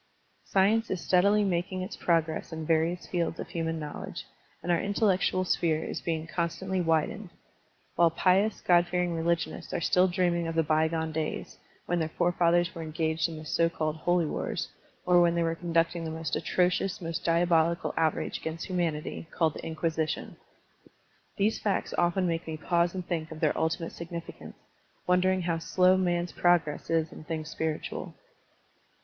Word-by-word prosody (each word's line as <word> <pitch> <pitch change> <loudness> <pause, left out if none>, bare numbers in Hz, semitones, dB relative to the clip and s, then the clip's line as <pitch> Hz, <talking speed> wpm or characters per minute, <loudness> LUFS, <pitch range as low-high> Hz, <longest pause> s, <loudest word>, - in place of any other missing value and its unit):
Science 215 +4 +2
is 185 - -1
steadily 200 +4 +3
making 185 0 -1
its 190 - -6
progress 165 -2 0
in 160 -1 -5
various 165 +2 +1
fields 170 -2 -2
of - - -5
hiunan 165 -1 -2
knowledge, 150 -2 -6 0.4
and 175 - 0
our 170 - +3
intel 200 +2 -2
lectual 185 0 0
sphere 160 -3 +1
is - - -4
being 160 -2 -2
constantly 180 +3 -2
widened; 165 +4 0 0.7
while 170 -1 +5
pious. 190 +5 +2
God 175 -1 +4
fearing 180 -1 0
religionists 165 0 -1
are - - 0
still 180 +2 +3
dreaming 175 -2 +1
of 165 - -3
the 165 - +3
by 155 +1 +2
gone 160 0 -2
days, 155 0 -4 0.3
when 175 0 0
their 160 -1 -1
fore 175 +2 +1
fathers 175 0 +2
were 165 - -7
engaged 160 +1 -1
in 160 - -7
the 155 - -9
so 165 +2 +2
called 155 -2 -2
holy 175 +1 +1
wars, - - -3 0.4
or 180 -1 +5
when 170 0 +3
they 170 - +2
were 165 0 0
conducting 165 0 0
the 160 - -3
most 160 -1 -3
atrocious, 180 +2 +1
most 165 -2 -4
diabolical 170 0 +2
outrage 160 -2 0
against 160 +1 -5
humanity 165 -4 -2
called 160 -3 +1
the - - -8
Inquisition. 160 -1 -2 1.0
These 210 +2 +1
facts 205 -2 -1
often 175 +2 +2
make 165 -1 -2
me 160 -1 -4
pause 170 +2 +1
and 185 -1 -4
think 160 -3 -2
of 160 - -7
their 155 -2 +2
ultimate 160 +1 -1
significance, 170 0 -8 0.5
wondering 185 0 +2
how 165 -1 0
slow 180 +3 +4
man's 175 -2 0
progress 175 -4 +1
is 165 -1 +1
in - - -10
things 155 0 -4
spiritual. 160 -1 -4
170 Hz, 170 wpm, -28 LUFS, 160-180 Hz, 1.0 s, while